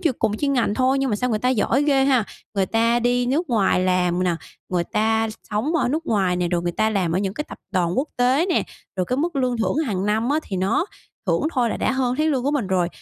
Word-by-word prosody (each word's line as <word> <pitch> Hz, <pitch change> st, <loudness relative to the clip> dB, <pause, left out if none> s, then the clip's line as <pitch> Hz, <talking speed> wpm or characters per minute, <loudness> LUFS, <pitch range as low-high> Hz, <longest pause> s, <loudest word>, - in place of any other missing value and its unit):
ch 345 Hz, -, +2 dB
cùng 210 Hz, -, +1 dB
ngành 270 Hz, -7 st, +1 dB
thôi 260 Hz, +1 st, +2 dB
nhưng 270 Hz, -2 st, 0 dB
mà 205 Hz, -, +1 dB
sao 250 Hz, +3 st, -1 dB
người 215 Hz, -, +1 dB
ta 250 Hz, +4 st, 0 dB
giỏi 255 Hz, +2 st, +2 dB
ghê 275 Hz, -2 st, +3 dB
ha. 255 Hz, -5 st, +3 dB, 0.3 s
Người 195 Hz, -1 st, +1 dB
ta 230 Hz, +1 st, +2 dB
đi 245 Hz, +1 st, +1 dB
nước 300 Hz, +6 st, 0 dB
ngoài 200 Hz, -5 st, +2 dB
làm 180 Hz, -1 st, +1 dB
nè, 175 Hz, -, +1 dB, 0.3 s
người 175 Hz, -2 st, 0 dB
ta 220 Hz, +3 st, +1 dB, 0.2 s
sống 225 Hz, +11 st, -1 dB
ở 295 Hz, -, +1 dB
nước 315 Hz, +5 st, -2 dB
ngoài 190 Hz, -5 st, +1 dB
nè, 175 Hz, -1 st, 0 dB
rồi 170 Hz, -1 st, 0 dB
người 175 Hz, 0 st, -1 dB
ta 220 Hz, +4 st, +1 dB
làm 185 Hz, -6 st, 0 dB
ở 180 Hz, -, +1 dB
những 195 Hz, 0 st, -2 dB
cái 300 Hz, -, -3 dB
tập -, -, -9 dB
đoàn 175 Hz, -2 st, +1 dB
quốc 295 Hz, -, 0 dB
tế 255 Hz, +7 st, +3 dB
nè, 350 Hz, -, +2 dB, 0.3 s
rồi 185 Hz, -, +1 dB
cái 255 Hz, -, -1 dB
mức 325 Hz, +1 st, -1 dB
lương 250 Hz, -2 st, +1 dB
thưởng 225 Hz, -, 0 dB
hàng 195 Hz, -2 st, -1 dB
năm 220 Hz, +3 st, +1 dB
á 300 Hz, -, +2 dB
thì 190 Hz, -, -5 dB
nó 195 Hz, -, +1 dB, 0.4 s
thưởng -, -, +1 dB
thôi 245 Hz, -4 st, +1 dB
là -, -, -2 dB
đã -, -, 0 dB
hơn 255 Hz, -2 st, 0 dB
tháng 310 Hz, -, +2 dB
lương 270 Hz, -5 st, +1 dB
của 280 Hz, -, +1 dB
mình 285 Hz, -9 st, 0 dB
rồi. 180 Hz, -2 st, +1 dB
230 Hz, 265 wpm, -22 LUFS, 190-270 Hz, 0.4 s, ghê